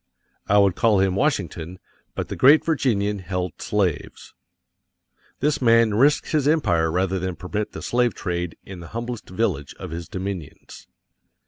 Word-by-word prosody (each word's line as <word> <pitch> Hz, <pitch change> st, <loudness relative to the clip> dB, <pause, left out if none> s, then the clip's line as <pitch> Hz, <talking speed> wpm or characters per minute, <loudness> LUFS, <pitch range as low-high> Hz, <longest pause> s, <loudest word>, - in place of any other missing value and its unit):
I 105 Hz, -, +4 dB
would 100 Hz, -3 st, +4 dB
call 110 Hz, -4 st, +3 dB
him 95 Hz, -1 st, +2 dB
Washington, 95 Hz, -, -1 dB, 0.4 s
but -, -, -3 dB
the -, -, -5 dB
great 145 Hz, +4 st, +6 dB
Virginian 105 Hz, -10 st, 0 dB
held 90 Hz, -2 st, -4 dB
slaves. 95 Hz, -7 st, -2 dB, 1.1 s
This 145 Hz, +1 st, +1 dB
man 115 Hz, -2 st, +4 dB
risked 140 Hz, +7 st, +3 dB
his 150 Hz, -3 st, +1 dB
empire 85 Hz, -, +2 dB
rather 95 Hz, +2 st, 0 dB
than 90 Hz, 0 st, -3 dB
permit 105 Hz, +4 st, -4 dB
the -, -, -7 dB
slave 120 Hz, -2 st, +1 dB
trade 85 Hz, -1 st, -3 dB
in 95 Hz, -2 st, -10 dB
the 85 Hz, -, -9 dB
humblest 120 Hz, -1 st, -5 dB
village 90 Hz, -8 st, -2 dB
of -, -, -8 dB
his 85 Hz, +1 st, -6 dB
dominions. 95 Hz, -5 st, -7 dB
100 Hz, 150 wpm, -23 LUFS, 90-120 Hz, 1.1 s, great